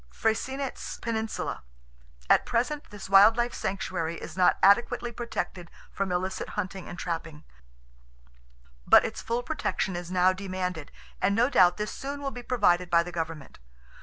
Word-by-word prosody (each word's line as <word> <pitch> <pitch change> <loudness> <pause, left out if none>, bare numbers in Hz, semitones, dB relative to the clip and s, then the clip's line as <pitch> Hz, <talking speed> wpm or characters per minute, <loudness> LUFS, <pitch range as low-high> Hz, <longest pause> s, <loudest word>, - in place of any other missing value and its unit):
Freycinet's 260 - -2
Peninsula.—At - - -3
present 255 +5 -1
this 205 -1 -9
wild 195 +4 +7
life 240 0 0
sanctuary 180 -4 -3
is 165 - -8
not 185 -1 +4
adequately 235 +4 +4
protected 205 -7 -5 0.2
from 195 -1 -2
illicit 185 +2 -2
hunting 190 -2 -4
and 175 - -8
trapping; 165 -3 -5 1.4
but - - +7
its - - -5
full 235 +1 -2
protection 190 - -2
is 175 0 -5
now 185 0 +3
demanded, 185 -4 -4 0.3
and 200 +2 +2
no 240 +5 +3
doubt 180 -5 +5
this 210 0 -3
soon 280 +1 -5
will 275 -1 -3
be 245 - -8
provided 180 -8 +2
by 170 -1 +4
the 175 - -8
government. 165 -3 -6
190 Hz, 145 wpm, -27 LUFS, 175-230 Hz, 1.4 s, wild